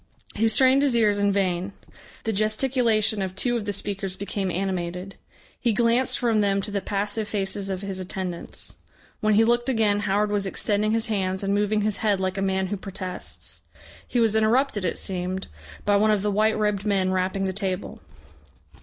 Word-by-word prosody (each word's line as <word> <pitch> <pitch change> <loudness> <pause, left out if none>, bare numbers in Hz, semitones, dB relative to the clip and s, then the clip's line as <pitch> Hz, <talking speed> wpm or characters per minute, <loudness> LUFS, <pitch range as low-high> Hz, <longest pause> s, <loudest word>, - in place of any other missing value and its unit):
He 225 +2 +2
strained 260 +4 +5
his 280 -4 +3
ears 210 -3 +3
in 200 0 +2
vain. 190 -1 -1 0.5
The 225 - -1
gesticulation 215 0 +2
of 190 -1 -3
two 240 +4 +1
of 225 -3 -2
the 205 - -1
speakers 195 -1 -4
became 200 -1 -3
animated. 180 0 -3 0.5
He 235 -3 +1
glanced 235 +3 +3
from 230 -3 +2
them 200 -1 +2
to 210 - -4
the 200 -1 -1
passive 205 +2 -2
faces 195 -1 -2
of 190 0 -3
his 195 -1 -4
attendants.... 185 -1 -6 0.4
When 215 -1 +2
he 220 - +5
looked 240 +2 +2
again 215 -5 +2
Howard 205 0 0
was 200 -1 0
extending 210 +2 0
his 225 0 +1
hands 190 -4 -1
and 195 0 0
moving 210 +1 +1
his 210 -1 0
head 205 -3 +1
like 190 +1 -2
a - - -1
man 190 0 0
who - - -2
protests. 185 -1 -8 0.5
He 245 - 0
was 225 -2 +3
interrupted, 220 -1 +2
it 170 - -1
seemed, 185 0 -3 0.4
by 205 0 +4
one 215 +2 +3
of 210 -2 +2
the 210 - +1
white 215 +2 +2
robed 210 -2 0
men 195 -3 +1
rapping 185 +1 0
the 190 - -2
table. 190 -1 -4
205 Hz, 190 wpm, -24 LUFS, 190-215 Hz, 0.5 s, strained